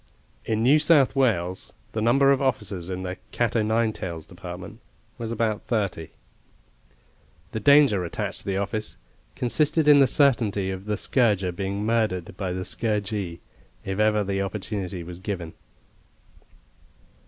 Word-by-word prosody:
In 110 0 0
New 140 +5 +5
South 150 -4 +4
Wales 95 -9 0 0.2
the 110 - -3
number 135 +5 +4
of 140 - +2
officers 105 -9 -2
in 95 0 -4
the 90 0 -4
cat 120 -2 0
o' 115 - +3
nine 110 +1 +1
tails 85 -5 -6
department 90 0 -9 0.4
was 115 -1 -4
about 110 -2 -1
thirty. 100 -8 -1 1.4
The 110 - -3
danger 140 -8 +5
attached 85 - -4
to - - -7
the 95 -1 0
office 105 +2 -3 0.4
consisted 150 +6 +1
in 145 -1 +8
the 135 - +6
certainty 115 -9 +2
of 95 +1 -6
the 105 -1 -1
scourger 105 -8 +1
being 100 +3 -3
murdered 110 -7 0
by 95 -2 -3
the 95 +1 -4
scourgee, 105 -5 -2 0.4
if 95 +1 -3
ever 105 -1 +3
the 100 0 -1
opportunity 95 -2 -4
was 90 +1 -9
given. 95 -5 -5
105 Hz, 145 wpm, -25 LUFS, 95-115 Hz, 1.4 s, in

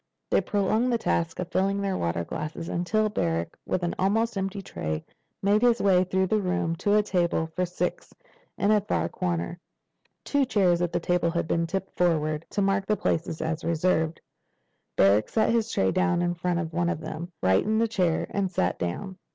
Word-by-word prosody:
They - - +4
prolonged 215 +5 +1
the 235 - +2
task 165 -7 -1
of 180 - -5
filling 195 +1 +1
their 195 -1 -1
water 85 - -1
glasses 155 - -5
until 215 +5 +1
Barrack, 85 - -1
with 185 - -1
an 175 - 0
almost 225 +5 +1
empty 195 +1 -2
tray, 80 - -4 0.4
made 205 +2 +3
his 240 -1 +4
way 185 -2 +4
through 190 +1 +1
the 215 +3 +1
room 180 -3 0
to 205 +3 +2
a 210 - +4
table 175 -5 +1
for 180 0 0
six 180 0 -3 0.5
in 200 - +2
a 210 -1 +4
far 205 - -1
corner. 175 -1 -3 0.7
Two 285 -1 +2
chairs 190 -9 +2
at 175 -1 0
the - - 0
table 175 0 +1
had 170 -1 -1
been 165 +1 0
tipped 190 +2 -4
forward, 155 -3 +1
to 200 - 0
mark 195 0 +1
the 210 - +2
places 165 -2 -1
as 160 +1 -2
reserved. 165 -1 +1 0.8
Barrack 100 +2 +4
set 220 0 +2
his 230 -1 +1
tray 95 - +2
down 185 -2 +1
in 175 0 +1
front 175 0 -1
of 165 -1 -3
one 175 +1 +1
of 165 - -2
them, 165 +2 -6
righted 200 - +3
the 230 - +3
chair, 180 -7 +1
and 200 -2 0
sat 90 - 0
down. 180 - -4
180 Hz, 195 wpm, -26 LUFS, 165-200 Hz, 0.8 s, They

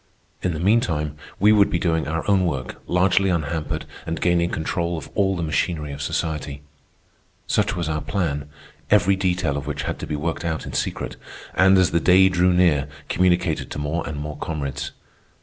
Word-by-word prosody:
In 90 -3 -1
the - - -4
meantime 85 -7 +1 0.2
we 105 +2 +6
would 105 -2 +5
be - - +1
doing 80 -4 0
our 80 +1 -2
own 100 -2 +4
work, 65 -5 -4
largely 95 +2 +3
unhampered, 80 -2 -2 0.2
and 80 -1 -2
gaining 85 -1 +2
control 85 +1 -2
of 80 - -8
all 95 -1 +2
the 85 - -3
machinery 75 -1 -1
of 70 0 -7
society. 75 -1 -3 0.8
Such - - +1
was 85 -3 -2
our 75 -1 -1
plan, 75 -7 -2 0.4
every 100 -1 +4
detail 90 -6 0
of 70 - -5
which - - -3
had - - -3
to - - -5
be 75 - -2
worked 80 +3 -3
out 80 -2 -2
in - - -7
secret, - - -3 0.4
and, 95 +2 +5
as 95 -2 +4
the 85 - +3
day 95 +3 +6
drew 90 0 +3
near, 85 -6 +3 0.2
communicated 90 -6 +1
to - - -6
more 75 +3 -2
and 75 - -5
more 75 0 -5
comrades. 75 -3 -4
85 Hz, 185 wpm, -23 LUFS, 75-90 Hz, 0.8 s, we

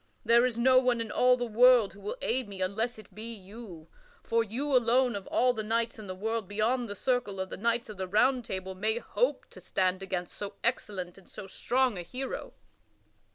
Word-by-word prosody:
There 235 +2 +5
is 235 -2 -4
no 255 +2 +6
one 250 -2 +1
in 225 -2 -3
all 250 0 +4
the 245 - -2
world 240 -1 +5
who 200 - -15
will 205 - -4
aid 250 0 +1
me 195 -1 -8
unless 220 +6 -1
it 210 -2 -14
be 220 +4 -6
you, 195 -5 -11 0.4
for 230 0 +1
you 260 +6 -2
alone 245 0 +3
of 200 -2 -6
all 250 +1 +3
the 220 - -3
knights 230 +1 -1
in 210 - -9
the 185 - -5
world 220 +1 -2
beyond 225 +4 0
the 205 - -5
circle 245 -4 -1
of 190 0 -4
the - - -4
knights 235 +3 0
of 215 -2 -9
the 190 0 -3
Round 245 +6 +3
Table 190 -3 -5
may 215 +4 0
hope - - -1
to - - -12
stand 185 0 0
against 180 -2 -4
so 205 0 -6
excellent 195 -6 -2
and 190 - -20
so - - -8
strong 245 +2 0
a - - -3
hero!" 255 +9 -5
225 Hz, 215 wpm, -29 LUFS, 195-245 Hz, 0.4 s, no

